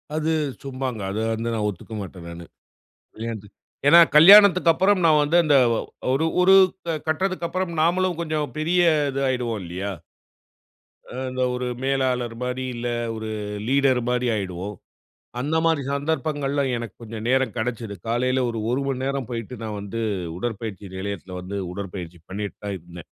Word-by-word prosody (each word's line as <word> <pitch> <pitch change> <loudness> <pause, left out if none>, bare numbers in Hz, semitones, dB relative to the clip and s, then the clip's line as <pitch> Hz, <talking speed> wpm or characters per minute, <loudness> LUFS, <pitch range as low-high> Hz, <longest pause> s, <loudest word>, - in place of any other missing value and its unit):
அது 155 +1 0 0.3
சும்மாங்க. 130 -4 -4
அத 100 - -4 0.2
வந்து 115 +1 -2
நான் 105 -2 -1
ஒத்துக்க 105 +3 -9
மாட்டேன், 90 -2 -10
நானு. 85 0 -9 0.7
கல்யாணத்துக்கு 110 -2 -7 0.3
ஏன்னா, 170 +3 +9
கல்யாணத்துக்கப்புறம் 185 +2 +7
நான் 155 -2 +5
வந்து 150 +4 +2
அந்த 150 -2 +3 0.6
ஒரு- 155 +5 +1
ஒரு 185 +1 +6 0.5
கட்டதுக்கப்புறம் 185 +1 -1
நாமளும் 175 +1 +2
கொஞ்சம் 155 -5 -2
பெரிய 175 +3 +2 0.3
இது 135 +1 -3
ஆயிடுவோம், 120 -5 -1
இல்லியா? 90 +4 -4 1.2
அ - - -11 0.2
அந்த 130 0 -3
ஒரு 125 0 -3 0.2
மேலாளர் 130 -3 0
மாரி 125 +1 -2
இல்ல, 120 +1 -4 0.3
ஒரு 110 0 -5 0.4
லீடர் 135 -1 +3
மாரி 125 0 0
ஆயிடுவோம். 95 0 -4 0.6
அந்த 145 +5 -1
மாரி 160 -3 +2
சந்தர்ப்பங்கள்ல 145 -1 -1 0.2
எனக்கு 115 -4 -7
கொஞ்சம் 110 -1 -7
நேரம் 130 +1 +2
கெடைச்சிது. 110 -2 -3
காலைல 130 +2 +1
ஒரு 115 -1 -3
ஒரு 130 - 0
மணிநேரம் 135 -1 -2
போய்ட்டு, 115 +1 -5
நான் 105 -2 -4
வந்து 100 +3 -5 0.4
உடற்பயிற்சி 105 -3 -5
நெலையத்துல 95 -2 -5
வந்து, 100 +2 -5
உடற்பயிற்சி 90 -3 -7
பண்ணிட்டு 100 +1 -5
தான் 100 -1 -3
இருந்தேன். 85 -1 -12
125 Hz, 140 wpm, -23 LUFS, 105-150 Hz, 1.2 s, ஏன்னா